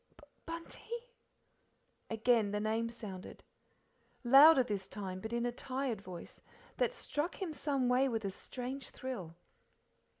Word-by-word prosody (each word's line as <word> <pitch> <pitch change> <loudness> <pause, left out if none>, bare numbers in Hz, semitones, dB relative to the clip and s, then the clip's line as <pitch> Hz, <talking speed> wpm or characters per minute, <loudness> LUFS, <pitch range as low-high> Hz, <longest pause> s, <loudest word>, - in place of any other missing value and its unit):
"Bunty." 460 +8 -6 1.0
Again 225 -1 +3
the 210 +1 -1
name 220 +2 0
sounded. 205 -5 -8 0.8
Louder 275 +3 +9
this 205 -5 -3
time, 190 -2 -5
but 220 - -5
in 235 0 0
a 245 - +1
tired 255 -3 -3
voice, 185 -3 -9 0.4
that - - +1
struck 300 -3 -2
him 365 -5 -3
some 280 -4 0
way 255 +2 +4
with 225 -3 -2
a 195 - -1
strange 255 +6 -6
thrill. 195 -11 -6
245 Hz, 130 wpm, -34 LUFS, 210-275 Hz, 1.0 s, Louder